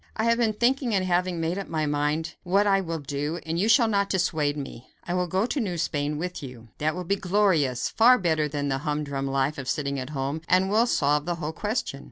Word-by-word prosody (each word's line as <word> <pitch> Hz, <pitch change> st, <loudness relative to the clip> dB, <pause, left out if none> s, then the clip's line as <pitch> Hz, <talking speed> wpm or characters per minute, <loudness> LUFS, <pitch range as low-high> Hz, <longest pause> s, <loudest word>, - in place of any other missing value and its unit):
"I 220 Hz, -, -1 dB
have 230 Hz, +1 st, +2 dB
been 225 Hz, -2 st, +2 dB
thinking 240 Hz, +1 st, +1 dB
and 185 Hz, -1 st, +1 dB
have 180 Hz, 0 st, +1 dB
made 170 Hz, +2 st, -2 dB
up 195 Hz, -, -6 dB
my 155 Hz, -2 st, -1 dB
mind 150 Hz, +2 st, -1 dB
what 195 Hz, +3 st, +2 dB
I 195 Hz, -1 st, +3 dB
will 165 Hz, -3 st, -3 dB
do, 145 Hz, +3 st, -3 dB
and 165 Hz, +1 st, -2 dB
you 210 Hz, +4 st, +2 dB
shall 230 Hz, +1 st, +5 dB
not 200 Hz, -2 st, +1 dB
dissuade 155 Hz, -6 st, 0 dB
me. 135 Hz, -3 st, -8 dB
I 175 Hz, -, -4 dB
will 180 Hz, 0 st, 0 dB
go 190 Hz, +5 st, +1 dB
to 275 Hz, -, -2 dB
New 190 Hz, -8 st, -2 dB
Spain 150 Hz, -2 st, -1 dB
with 180 Hz, +3 st, -4 dB
you. 125 Hz, -4 st, -10 dB
That 155 Hz, +1 st, 0 dB
will 180 Hz, -, -4 dB
be 195 Hz, +3 st, 0 dB
glorious 180 Hz, -, +1 dB
far 245 Hz, +3 st, +5 dB
better 160 Hz, -6 st, +1 dB
than 145 Hz, -1 st, -3 dB
the 135 Hz, -1 st, -1 dB
humdrum 145 Hz, -2 st, -2 dB
life 135 Hz, +2 st, 0 dB
of 130 Hz, -1 st, -5 dB
sitting 140 Hz, -1 st, -1 dB
at 130 Hz, +1 st, -5 dB
home 140 Hz, +1 st, -3 dB
and 185 Hz, +2 st, +3 dB
will 225 Hz, +3 st, +3 dB
solve 145 Hz, -7 st, +1 dB
the 175 Hz, -, 0 dB
whole 160 Hz, -1 st, -4 dB
question." 210 Hz, -, -3 dB
165 Hz, 240 wpm, -26 LUFS, 145-195 Hz, -, shall